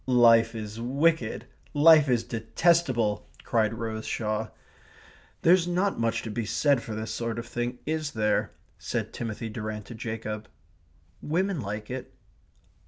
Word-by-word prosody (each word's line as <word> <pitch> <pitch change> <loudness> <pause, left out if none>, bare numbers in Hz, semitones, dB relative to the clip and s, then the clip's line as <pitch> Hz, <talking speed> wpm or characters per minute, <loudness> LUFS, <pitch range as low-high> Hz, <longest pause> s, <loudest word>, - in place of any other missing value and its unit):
"Life 115 -2 +5
is 110 0 -6
wicked 140 0 +1 0.3
life 155 -1 +7
is 120 -2 +2
detestable!" 120 -1 +1
cried 110 -2 +1
Rose 110 -1 -4
Shaw. 110 0 -1 1.0
"There's 175 +1 +5
not 185 0 0
much 115 -1 0
to 110 - -5
be 115 +2 -2
said 140 +4 +2
for 110 - -6
this 110 0 -4
sort 115 0 -3
of 115 - -4
thing, 120 +1 -3
is 155 -1 -2
there?" 105 -1 +1 0.3
said - - -3
Timothy 115 -1 -4
Durrant 105 -1 -5
to 120 - -9
Jacob. 110 -1 -5 0.7
"Women 180 +1 0
like 105 +2 -5
it." 130 0 -6
115 Hz, 140 wpm, -27 LUFS, 110-145 Hz, 1.0 s, life